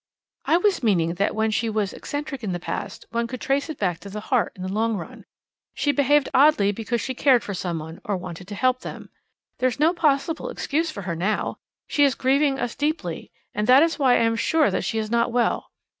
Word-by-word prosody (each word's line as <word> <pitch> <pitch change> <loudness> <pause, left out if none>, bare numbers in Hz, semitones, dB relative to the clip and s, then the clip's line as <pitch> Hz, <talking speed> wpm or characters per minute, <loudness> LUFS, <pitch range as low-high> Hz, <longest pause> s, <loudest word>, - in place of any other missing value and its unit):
"I 330 - +4
was 390 +1 +1
meaning 175 -8 +2
that 200 - +1
when 220 0 +1
she 225 +1 0
was 210 -3 -1
eccentric 290 -3 -5
in 195 -4 -2
the 175 - -3
past, - - -5
one 235 0 -1
could 255 +1 -6
trace 280 +3 0
it 315 - -5
back 180 -4 -1
to 200 - -10
the 210 +2 -5
heart 250 -3 +2
in 185 - -8
the 185 +1 -4
long 225 +1 0
run. 170 - -9 0.5
She 290 - +1
behaved 285 0 +3
oddly 265 -8 +5
because 230 +3 -2
she 260 - -3
cared 255 -2 +4
for 200 - -5
someone, 165 -3 -5
or 200 -2 -1
wanted 180 0 -8
to 205 - -6
help 255 +2 +2
them. - - -9 0.5
There's 255 +1 0
no 320 +3 +4
possible 320 - 0
excuse 325 - -1
for 200 -10 -7
her 170 -2 -3
now. 195 +6 -1 0.3
She 290 - +2
is 275 -2 +4
grieving 275 +1 +2
us 245 - -2
deeply, 305 +2 -3 0.2
and 210 - -1
that 260 +4 +7
is 330 -1 0
why 260 -3 +4
I - - +3
am 230 0 +2
sure 315 +4 +2
that - - -1
she 225 - -2
is 215 0 -2
not 235 0 +2
well. 240 -1 0
235 Hz, 225 wpm, -24 LUFS, 205-285 Hz, 0.5 s, that